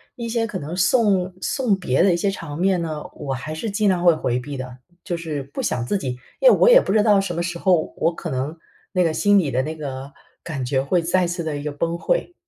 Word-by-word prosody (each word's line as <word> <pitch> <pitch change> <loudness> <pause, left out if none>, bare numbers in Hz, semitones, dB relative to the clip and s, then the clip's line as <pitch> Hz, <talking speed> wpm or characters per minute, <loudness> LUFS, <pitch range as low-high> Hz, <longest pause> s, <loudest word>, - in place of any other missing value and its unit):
一 235 -1 -5
些 225 0 0
可 210 - -4
能 155 +5 -6
送 190 -2 +2
送 250 -4 +1
别 135 -9 +1
的 190 - +4
一 - - +1
些 195 +3 0
场 150 -6 -7
面 185 0 +2
呢， 155 -2 -4
我 135 - -4
还 155 +5 -5
是 190 +8 -4
尽 205 0 +1
量 180 -2 +1
会 170 -2 +6
回 125 -5 -1
避 140 +3 -7
的， 125 -1 -7 0.3
就 175 - -3
是 155 -4 -4
不 140 - -6
想 120 - -1
自 200 - 0
己， 130 -9 -4 0.2
因 - - +7
为 - - +8
我 - - +5
也 - - +9
不 205 - -1
知 215 -1 +4
道 210 -3 +5
什 195 -3 -2
么 170 - -1
时 175 -1 -4
候， 180 -4 +2
我 165 +1 +1
可 170 - -6
能 135 +4 -3 0.4
那 180 -1 +3
个 165 - +2
心 205 +4 +4
里 155 -7 -1
的 130 - +1
那 155 +4 -4
个 140 -2 -7 0.3
感 145 -5 -5
觉 130 +1 0
会 170 +6 +1
再 175 +2 +1
次 175 0 -3
地 155 -2 -3
一 145 - -6
个 150 - -2
崩溃。 170 - -1
170 Hz, 285 characters per minute, -22 LUFS, 145-195 Hz, 0.4 s, 也